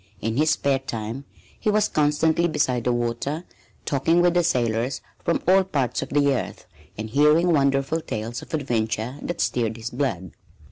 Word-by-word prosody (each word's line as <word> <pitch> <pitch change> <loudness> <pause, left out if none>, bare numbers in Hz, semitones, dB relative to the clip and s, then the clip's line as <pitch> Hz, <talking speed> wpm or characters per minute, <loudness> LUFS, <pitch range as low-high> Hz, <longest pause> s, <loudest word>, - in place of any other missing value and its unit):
In 115 +1 -2
his 155 +2 +3
spare 140 -3 +2
time 120 0 -5 0.3
he - - 0
was 210 0 +3
constantly 155 +3 +2
beside 125 -7 0
the 125 - +2
water, 120 +7 -2 0.4
talking 165 +5 +2
with 175 0 +4
the 175 0 +3
sailors 120 -2 0 0.2
from 170 - 0
all 190 +1 +6
parts 140 -10 -1
of - - -5
the 140 -1 +3
earth 130 - -4 0.3
and 110 +1 -5
hearing 150 +6 +4
wonderful 140 +2 +1
tales 115 -3 -5
of - - -13
adventure 120 -2 -2
that 175 - -4
stirred 115 -2 0
his 115 +1 -6
blood. 115 - -2
135 Hz, 170 wpm, -24 LUFS, 115-155 Hz, 0.4 s, all